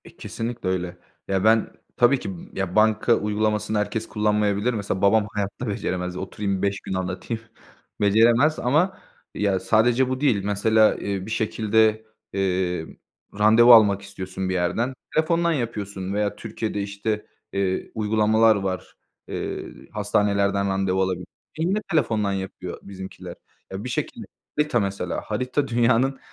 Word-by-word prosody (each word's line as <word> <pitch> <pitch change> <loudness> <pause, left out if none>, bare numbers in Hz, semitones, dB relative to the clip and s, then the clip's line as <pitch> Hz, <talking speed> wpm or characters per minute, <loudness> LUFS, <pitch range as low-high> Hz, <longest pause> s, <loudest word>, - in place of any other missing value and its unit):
E, - - -15
kesinlikle 115 -4 -4
öyle. 90 -1 -2 0.3
Ya, 95 -1 0
ben 110 0 +3 0.3
tabii 125 +2 +4
ki, 100 - -5 0.2
ya, 95 -2 -3
banka 110 +2 +4
uygulamasını 105 0 0
herkes 105 +1 -2
kullanmayabilir. 105 +2 +1
Mesela 100 -3 -3
babam 105 +1 +4
hayatta 105 +4 -3
beceremez. 90 -3 -3
Oturayım 95 +1 -3
5 100 0 0
gün - - -5
anlatayım, 95 +5 -3 0.6
beceremez 115 +9 +4
ama 155 +10 +2 0.4
ya, 100 -2 +1
sadece 115 +7 +3
bu 130 +1 -3
değil. 120 -10 +2
Mesela, 110 +2 +3
eee, 100 -2 -3
bir 110 - -7
şekilde, 110 0 +1 0.3
eee, 90 -3 0 0.5
randevu 115 +3 +7
almak 105 -4 +6
istiyorsun 95 -1 -5
bir - - 0
yerden. 95 +8 0 0.2
Telefondan 170 +2 +2
yapıyorsun 100 - -3
veya 105 0 0
Türkiye'de 105 -2 -4
işte, 100 +2 -3 0.3
eee, 95 -1 -1
uygulamalar 110 +1 +3
var. 95 -2 -4 0.3
Eee, - - -4 0.3
hastanelerden 100 -1 +1
randevu 95 -1 0
alabiliyorsun. 90 -1 -1 0.3
Yine, 180 +6 +1
telefondan 110 -10 +1
yapıyor 95 -2 -5
bizimkiler. 95 -1 -9 0.4
Ya, 95 +2 -5
bir 125 - -5
şekilde - - -4 0.3
Harita 150 -5 +2
mesela. 100 -1 -2
Harita 130 +3 -2
dünyanın 125 +3 +2
105 Hz, 135 wpm, -24 LUFS, 95-115 Hz, 0.6 s, randevu